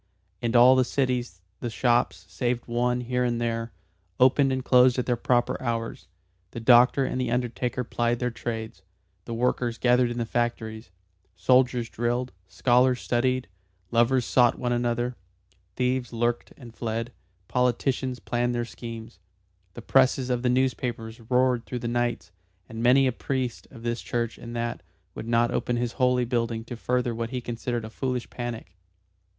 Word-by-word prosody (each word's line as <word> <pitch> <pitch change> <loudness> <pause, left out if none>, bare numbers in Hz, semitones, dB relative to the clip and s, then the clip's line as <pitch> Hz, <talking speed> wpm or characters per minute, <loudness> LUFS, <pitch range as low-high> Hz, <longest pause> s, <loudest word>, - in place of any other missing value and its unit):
In 120 0 -1
all 125 +2 +8
the 130 - +4
cities 125 -8 -2 0.2
the 120 - -3
shops, 120 -4 +1
save 120 +5 -2
one 125 +1 0
here 125 +1 -1
and 120 -1 0
there, 115 -1 -2 0.5
opened 135 +2 +5
and 130 -1 -2
closed 125 0 +5
at 125 - 0
their 125 - +1
proper 120 0 +1
hours, 115 -2 -3 0.4
the 115 - -7
doctor 125 +3 +5
and 130 - -2
the 125 - -1
undertaker 125 +1 -1
plied 120 0 0
their 125 0 -1
trades, 110 -3 -5 0.4
the 115 - -5
workers 120 0 0
gathered 125 0 +3
in 120 - -4
the 120 - -1
factories, 110 -3 -2 0.5
soldiers 125 +4 +3
drilled, 120 +2 -2 0.2
scholars 125 +4 +3
studied, 130 +1 0 0.4
lovers 120 +1 +3
sought 120 0 +3
one 125 -1 -2
another, 120 0 -1 0.6
thieves 125 -1 0
lurked 120 0 -1
and 120 -4 -12
fled, 115 +1 -3 0.3
politicians 125 +1 0
planned 120 0 -1
their 120 0 -1
schemes. 115 -5 -9 0.6
The 120 - -8
presses 130 0 +3
of 125 -1 0
the 125 - +1
newspapers 125 -3 -1
roared 125 -1 +2
through 125 - -4
the 120 - -4
nights, 120 0 -1 0.4
and 115 0 -7
many 130 +3 +5
a 130 - +2
priest 125 0 -3
of 115 -3 -13
this 120 0 -2
church 120 -1 -3
and 120 0 -8
that 120 0 -3 0.3
would 115 - -7
not 115 0 +2
open 120 - -1
his 120 -1 -1
holy 125 0 +2
building 115 -2 -1
to 120 +1 -7
further 125 +1 -1
what 115 0 -3
he 125 0 -3
considered 120 -1 -4
a 110 - -9
foolish 125 0 -3
panic. 120 -7 -6
120 Hz, 165 wpm, -26 LUFS, 115-125 Hz, 0.6 s, all